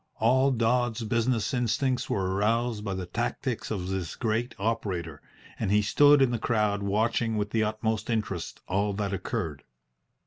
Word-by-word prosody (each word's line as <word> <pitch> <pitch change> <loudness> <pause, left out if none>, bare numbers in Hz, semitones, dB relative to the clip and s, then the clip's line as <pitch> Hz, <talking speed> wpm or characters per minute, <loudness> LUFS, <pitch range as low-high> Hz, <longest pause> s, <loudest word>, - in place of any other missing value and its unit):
All 130 +4 +3
Dodds's 120 -1 +1
business 115 +1 0
instincts 125 +1 0
were 95 -2 0
aroused 110 +2 0
by 100 -2 -3
the 95 -1 -4
tactics 120 +4 -3
of 95 -5 -3
this 95 -3 -3
great 115 +1 -1
operator, 95 -8 -2 0.4
and 105 - -1
he 105 +1 +3
stood 145 +6 +6
in 125 - +2
the 120 - -1
crowd 105 -3 +1
watching 110 +2 0
with 105 0 -2
the 110 -1 +2
utmost 110 +1 -1
interest 105 -7 -3
all 100 +2 0
that 100 -1 -2
occurred. 80 -6 -3
110 Hz, 160 wpm, -27 LUFS, 100-120 Hz, 0.4 s, stood